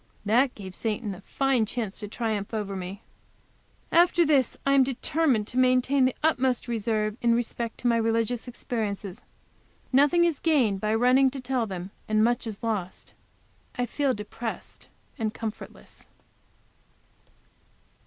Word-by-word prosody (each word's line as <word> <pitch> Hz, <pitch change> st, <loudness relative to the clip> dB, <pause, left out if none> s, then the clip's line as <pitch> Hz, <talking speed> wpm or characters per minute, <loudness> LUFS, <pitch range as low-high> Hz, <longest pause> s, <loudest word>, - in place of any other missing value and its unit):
That 245 Hz, +5 st, +3 dB
gave 190 Hz, -3 st, -9 dB
Satan 210 Hz, 0 st, -3 dB
a 185 Hz, -, -11 dB
fine 260 Hz, 0 st, +1 dB
chance 220 Hz, -3 st, -4 dB
to 210 Hz, -, -5 dB
triumph 215 Hz, -1 st, -3 dB
over 200 Hz, -2 st, -3 dB
me! 190 Hz, +2 st, -6 dB, 0.9 s
After 345 Hz, 0 st, +5 dB
this 280 Hz, -5 st, +2 dB
I 275 Hz, -, +3 dB
am 275 Hz, -, +6 dB
determined 265 Hz, -2 st, 0 dB
to 250 Hz, -, -1 dB
maintain 255 Hz, +1 st, +3 dB
the 255 Hz, -, 0 dB
utmost 260 Hz, -6 st, +1 dB
reserve 215 Hz, -2 st, -1 dB
in 235 Hz, -1 st, +3 dB
respect 235 Hz, -1 st, -3 dB
to 245 Hz, -, 0 dB
my 235 Hz, -1 st, +3 dB
religious 230 Hz, +1 st, 0 dB
experiences. 215 Hz, -4 st, -4 dB, 0.7 s
Nothing 295 Hz, +6 st, +5 dB
is 330 Hz, -5 st, 0 dB
gained 245 Hz, -, +2 dB
by 215 Hz, +1 st, +1 dB
running 255 Hz, +3 st, +4 dB
to 270 Hz, +1 st, -7 dB
tell 255 Hz, -2 st, -1 dB
them, 190 Hz, -1 st, -6 dB, 0.2 s
and 215 Hz, 0 st, +3 dB
much 240 Hz, 0 st, +1 dB
is 215 Hz, -1 st, -7 dB
lost. 205 Hz, -5 st, -4 dB, 0.6 s
I 245 Hz, -, 0 dB
feel 270 Hz, +2 st, 0 dB
depressed 215 Hz, +2 st, -7 dB, 0.3 s
and 220 Hz, -1 st, -2 dB
comfortless. 220 Hz, -2 st, -8 dB
235 Hz, 145 wpm, -26 LUFS, 215-260 Hz, 0.9 s, am